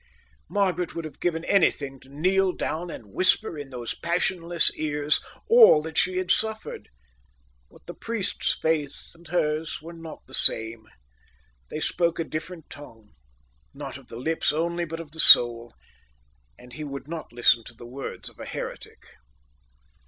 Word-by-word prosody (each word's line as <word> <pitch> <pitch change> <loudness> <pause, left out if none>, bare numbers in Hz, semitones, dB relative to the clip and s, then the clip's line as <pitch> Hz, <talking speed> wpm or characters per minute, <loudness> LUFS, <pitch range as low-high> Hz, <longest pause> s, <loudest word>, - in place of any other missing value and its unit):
Margaret 180 -4 0
would 165 -1 -4
have 155 - -10
given 170 -1 -1
anything 140 -8 +2
to 135 - -19
kneel 185 +6 +1
down 170 +3 -3
and 105 -10 -10
whisper 185 0 +2
in 145 -2 -7
those 120 -3 -5
passionless 170 -1 0
ears 150 -1 0 0.3
all 460 - +8
that 160 0 -7
she 185 +1 +1
suffered, 220 +3 -1 0.8
but - - -20
the - - -7
priest's 225 -4 -2
faith 155 -3 -2
and 170 0 -17
hers 155 -1 -1
were 165 +2 -10
not 165 -1 -10
the 130 - -18
same. 110 -2 +3 0.8
They 155 - -4
spoke 170 +1 0
a 165 - 0
different 160 +1 -7
tongue, 115 -7 -13 0.6
not - - -7
of - - -19
the 115 - -9
lips 160 +6 0
only 170 +3 -1
but 165 0 -6
of 160 -3 -9
the 160 - -10
soul, 120 -4 +7 0.8
and 125 0 -14
he 155 - -6
would 140 -1 -7
not 165 0 -7
listen 120 -1 +4
to 120 - -10
the 120 - -12
words 130 +3 -7
of - - -11
an - - -7
heretic. - - -7
160 Hz, 160 wpm, -25 LUFS, 140-175 Hz, 0.8 s, all